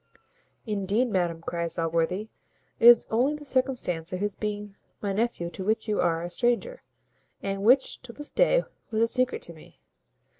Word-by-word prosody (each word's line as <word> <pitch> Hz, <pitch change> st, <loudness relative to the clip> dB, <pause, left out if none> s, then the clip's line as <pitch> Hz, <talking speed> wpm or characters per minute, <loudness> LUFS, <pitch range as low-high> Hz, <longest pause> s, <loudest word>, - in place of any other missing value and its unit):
"Indeed, 210 Hz, +3 st, 0 dB
madam," 175 Hz, -3 st, 0 dB
cries 170 Hz, -1 st, -3 dB
Allworthy, 170 Hz, +5 st, 0 dB, 0.5 s
"it 230 Hz, -, +6 dB
is 240 Hz, -1 st, +8 dB
only 255 Hz, +7 st, +2 dB
the 295 Hz, 0 st, -10 dB
circumstance 255 Hz, -, -1 dB
of 185 Hz, -, -3 dB
his 205 Hz, 0 st, -1 dB
being 210 Hz, -1 st, -4 dB, 0.2 s
my 200 Hz, -2 st, -2 dB
nephew 205 Hz, -5 st, -1 dB
to 190 Hz, -, -6 dB
which 220 Hz, +3 st, 0 dB
you 210 Hz, -1 st, +1 dB
are 165 Hz, 0 st, +1 dB
a 175 Hz, -, -4 dB
stranger, 245 Hz, -, 0 dB, 0.6 s
and 195 Hz, 0 st, -2 dB
which, 255 Hz, +6 st, +3 dB
till 245 Hz, -2 st, -12 dB
this 295 Hz, 0 st, -7 dB
day, -, -, +3 dB, 0.3 s
was 220 Hz, -1 st, +1 dB
a -, -, +3 dB
secret 255 Hz, +1 st, 0 dB
to 170 Hz, -, -6 dB
me. 160 Hz, -, -17 dB
210 Hz, 175 wpm, -27 LUFS, 180-245 Hz, 0.6 s, is